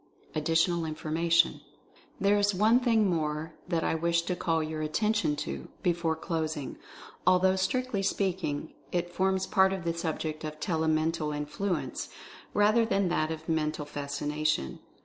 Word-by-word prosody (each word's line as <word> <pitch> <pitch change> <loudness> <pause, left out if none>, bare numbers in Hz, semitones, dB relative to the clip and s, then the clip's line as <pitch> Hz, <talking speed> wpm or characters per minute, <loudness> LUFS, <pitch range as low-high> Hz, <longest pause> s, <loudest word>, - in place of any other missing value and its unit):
ADDITIONAL 165 +2 +2
INFORMATION. 160 +2 +1 0.6
There 205 +1 +4
is 205 -1 +2
one 220 +5 +5
thing 225 -4 +3
more 155 -2 -1
that 170 -2 0
I - - +1
wish 170 +1 +1
to 180 +1 -1
call 165 -2 0
your 155 0 -4
attention 205 +2 +1
to, 70 -1 -6
before 170 -2 +1
closing, 160 -3 -3 0.5
although, 185 +1 +5
strictly 230 +3 0
speak 190 -1 0
ing, 145 0 -3 0.2
it 175 0 -1
forms 190 0 +1
part 190 0 +4
of 190 -2 -3
the 170 -1 0
subject 160 -2 -3
of 155 0 -5
Telemental 160 -2 +1
Influ 150 +3 -2
ence 130 - -6 0.4
rather 215 +3 +4
than 195 -4 +1
that 155 -2 +1
of 160 0 -6
Mental 155 -2 0
Fascination. 145 - -2
165 Hz, 150 wpm, -29 LUFS, 155-190 Hz, 0.6 s, one